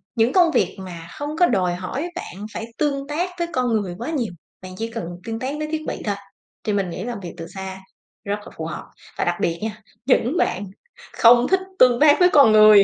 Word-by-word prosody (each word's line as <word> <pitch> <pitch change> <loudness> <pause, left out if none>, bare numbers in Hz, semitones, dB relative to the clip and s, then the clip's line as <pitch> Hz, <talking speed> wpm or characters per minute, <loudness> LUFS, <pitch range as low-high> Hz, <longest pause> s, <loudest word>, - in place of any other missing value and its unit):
những 230 +2 +2
công 350 -3 +5
việc - - +1
mà 175 -3 -8
không 290 0 -3
có 355 - +7
đòi 185 -5 +1
hỏi 260 - -4
bạn 205 - -7
phải 225 - -4
tương 280 -2 -1
tác 330 +5 -1
với 340 - 0
con 255 -1 +1
người 180 -3 -5
quá 240 +9 -5
nhiều, 245 - -2 0.3
bạn 185 0 -9
chỉ 225 - -2
cần 230 -5 -4 0.2
tương 225 0 -4
tác 265 +4 -3
với 305 0 -3
thiết 315 0 -1
bị - - -4
thôi 205 -1 0 0.5
thì 210 - -1
mình 195 -3 0
nghĩ 180 +3 -5
làm 235 -2 -4
việc 180 -3 -8
từ 165 - -7
xa 190 0 -6 0.4
rất 205 +1 -2
là - - -11
phù 160 - -4
hợp. 165 - -5 0.3
Và - - 0
đặc 175 - +1
biệt 170 0 0
nha, 215 -1 -4 0.2
những 265 +4 +2
bạn 200 +2 0 0.5
không 240 +1 +6
thích 380 0 +3 0.2
tương 245 -1 +6
tác 295 -1 +6
với 360 0 +6
con 280 -9 +6
người 215 -1 +8
225 Hz, 235 wpm, -22 LUFS, 190-285 Hz, 0.5 s, người